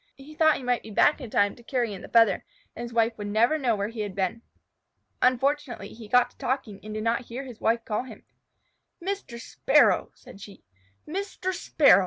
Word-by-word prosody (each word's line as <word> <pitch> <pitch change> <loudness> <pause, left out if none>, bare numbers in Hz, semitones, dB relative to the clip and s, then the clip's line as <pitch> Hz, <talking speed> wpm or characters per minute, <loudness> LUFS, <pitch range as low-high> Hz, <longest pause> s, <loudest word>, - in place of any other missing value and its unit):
He 275 +3 -12
thought 315 -1 +4
he - - -9
might 245 -1 +1
be - - -11
back 290 +8 +3
in 250 - -7
time 205 -1 +2
to - - -16
carry 235 -2 -1
in 190 - -8
the - - -9
feather 230 -3 +4 0.3
and - - -7
his 240 0 -6
wife 230 -1 +1
never 220 +9 +2
know 245 -5 +2
where 200 0 -2
he 230 -1 -9
had 205 -3 -3
been. 195 +4 -1 0.8
Unfortunately, 255 -3 +1
he 225 -1 -11
got 250 +3 +4
to - - -29
talking 240 -6 -2
and 215 0 -7
did 215 - -3
not 235 +2 0
hear 245 +4 -6
his 250 -5 -11
wife 230 +1 +1
call 215 +3 -2
him. 225 -5 -12 0.8
"Mr. 375 -10 -4
Sparrow!" - - +3
said 200 - -14
she. 200 0 -12 0.4
"_Mr. 375 +1 -3
Sparrow! 285 - +5
235 Hz, 205 wpm, -26 LUFS, 215-270 Hz, 0.8 s, Sparrow